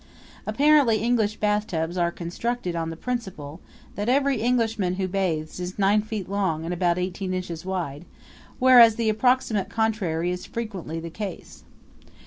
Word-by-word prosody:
Apparently 285 Hz, -6 st, +4 dB
English 220 Hz, -1 st, +1 dB
bathtubs 210 Hz, -6 st, -1 dB
are 175 Hz, -1 st, +1 dB
constructed 180 Hz, +3 st, -3 dB
on 165 Hz, -1 st, -2 dB
the 165 Hz, -, -5 dB
principle 185 Hz, -9 st, -5 dB, 0.3 s
that 205 Hz, +3 st, -2 dB
every 270 Hz, -2 st, +2 dB
Englishman 225 Hz, -6 st, +1 dB
who 190 Hz, 0 st, -1 dB
bathes 180 Hz, -5 st, -2 dB
is 180 Hz, +1 st, -5 dB
nine 205 Hz, +1 st, +3 dB
feet 215 Hz, -3 st, -5 dB
long 185 Hz, -5 st, -1 dB
and 175 Hz, -, -2 dB
about 175 Hz, -1 st, +1 dB
eighteen 185 Hz, +1 st, -3 dB
inches 175 Hz, -3 st, -5 dB
wide, 175 Hz, -5 st, -4 dB, 0.5 s
whereas 245 Hz, -4 st, +7 dB
the 230 Hz, -1 st, 0 dB
approximate 225 Hz, -2 st, +1 dB
contrary 190 Hz, -7 st, 0 dB
is 180 Hz, 0 st, -4 dB
frequently 195 Hz, -8 st, -5 dB
the 165 Hz, 0 st, -7 dB
case. 195 Hz, 0 st, -7 dB
195 Hz, 145 wpm, -25 LUFS, 175-225 Hz, 0.5 s, whereas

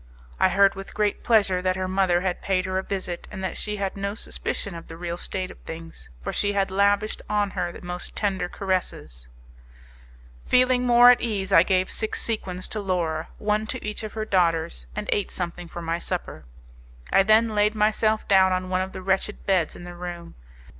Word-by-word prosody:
I 190 Hz, -, +5 dB
heard 195 Hz, +2 st, +5 dB
with 195 Hz, 0 st, -9 dB
great 210 Hz, -1 st, 0 dB
pleasure 200 Hz, -5 st, +3 dB
that 185 Hz, 0 st, +1 dB
her 185 Hz, 0 st, -2 dB
mother 185 Hz, -2 st, +2 dB
had 185 Hz, -1 st, -2 dB
paid 185 Hz, -1 st, 0 dB
her 190 Hz, 0 st, -1 dB
a -, -, -1 dB
visit, 185 Hz, -3 st, -4 dB
and 190 Hz, -2 st, -7 dB
that 190 Hz, -, -2 dB
she 210 Hz, -1 st, -2 dB
had 195 Hz, -1 st, -2 dB
no 200 Hz, +1 st, -3 dB
suspicion 200 Hz, -2 st, -4 dB
of 165 Hz, -1 st, -9 dB
the 165 Hz, -, -9 dB
real 170 Hz, 0 st, -4 dB
state 185 Hz, +1 st, -4 dB
of -, -, -15 dB
things, 165 Hz, -, -9 dB
for -, -, -3 dB
she 205 Hz, 0 st, +1 dB
had 195 Hz, -1 st, 0 dB
lavished 200 Hz, +2 st, +2 dB
on 205 Hz, -1 st, +1 dB
her 175 Hz, -1 st, -2 dB
the 175 Hz, -, -11 dB
most 180 Hz, 0 st, -6 dB
tender 190 Hz, -4 st, -1 dB
caresses. 180 Hz, -, -3 dB, 1.2 s
Feeling 250 Hz, 0 st, +4 dB
more 245 Hz, 0 st, +8 dB
at 245 Hz, -, +2 dB
ease 205 Hz, -5 st, -2 dB
I 165 Hz, -, +9 dB
gave 185 Hz, +1 st, +1 dB
six 220 Hz, -, -2 dB
sequins 185 Hz, -5 st, -2 dB
to 215 Hz, -, -3 dB
Laura, 170 Hz, -5 st, -1 dB
one 210 Hz, +1 st, 0 dB
to -, -, -5 dB
each 210 Hz, 0 st, -3 dB
of 215 Hz, -1 st, -6 dB
her 220 Hz, -1 st, -3 dB
daughters, 165 Hz, -, +1 dB
and -, -, -4 dB
ate 205 Hz, -, 0 dB
something 175 Hz, -1 st, -4 dB
for 170 Hz, +1 st, -7 dB
my 165 Hz, +1 st, -1 dB
supper: 170 Hz, -, -5 dB, 0.7 s
I -, -, +7 dB
then 215 Hz, +2 st, +4 dB
laid 210 Hz, +1 st, +2 dB
myself 215 Hz, +1 st, +2 dB
down 190 Hz, -1 st, +5 dB
on 185 Hz, 0 st, -1 dB
one 185 Hz, 0 st, +1 dB
of 190 Hz, 0 st, -4 dB
the 185 Hz, -, -7 dB
wretched 195 Hz, +2 st, -1 dB
beds 185 Hz, -5 st, +1 dB
in -, -, -10 dB
the 175 Hz, 0 st, -8 dB
room. 175 Hz, -1 st, -7 dB
190 Hz, 205 wpm, -25 LUFS, 175-210 Hz, 1.2 s, I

